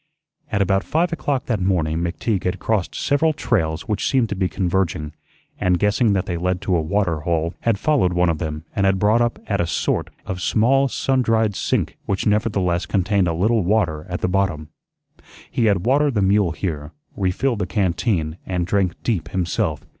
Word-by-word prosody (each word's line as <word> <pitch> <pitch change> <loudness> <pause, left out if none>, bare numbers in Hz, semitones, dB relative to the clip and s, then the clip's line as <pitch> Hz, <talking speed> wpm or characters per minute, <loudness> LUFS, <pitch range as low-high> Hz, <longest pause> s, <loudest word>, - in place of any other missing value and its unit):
At 100 - +2
about 95 0 +1
five 170 +2 0
o'clock 145 -5 -1
that 110 -6 -1
morning 85 -4 +1
McTeague 90 +4 -2
had 90 - 0
crossed 110 -4 -1
several 155 +3 +2
trails 85 - -1
which 105 -2 0
seemed 130 -5 +2
to 100 - -2
be 95 -1 0
converging, 85 -3 -1 0.5
and, 90 -1 +2
guessing 105 +3 +2
that 95 -2 0
they 85 - -3
led 90 +1 -1
to 95 -2 0
a 85 - +2
water 85 -1 0
hole, 80 +2 -1
had 115 -3 +1
followed 135 -6 +2
one 90 0 +2
of 80 - -4
them 75 -1 -4
and 100 -1 +2
had 95 0 +2
brought 105 +4 +3
up 120 0 0
at 100 -3 0
a 85 - -1
sort - - -1 0.2
of 95 -1 -4
small 135 +8 +3
sundried 115 -6 +1
sink - - -1
which 95 -1 -1
nevertheless 100 -4 +1
contained 100 -1 +1
a 85 - 0
little 105 +5 +2
water 85 -6 0
at 90 - -4
the - - +1
bottom. 90 -5 -1 0.8
He 115 - +1
had 100 -4 +2
watered 140 +1 +2
the 100 - +2
mule 95 -3 +3
here, 80 -4 -4 0.2
refilled 105 +6 0
the 90 - -1
canteen, 90 -4 0
and 90 -2 -2
drank 95 -1 0
deep 85 -10 -1
himself. 85 -5 -1
95 Hz, 190 wpm, -21 LUFS, 85-110 Hz, 0.8 s, brought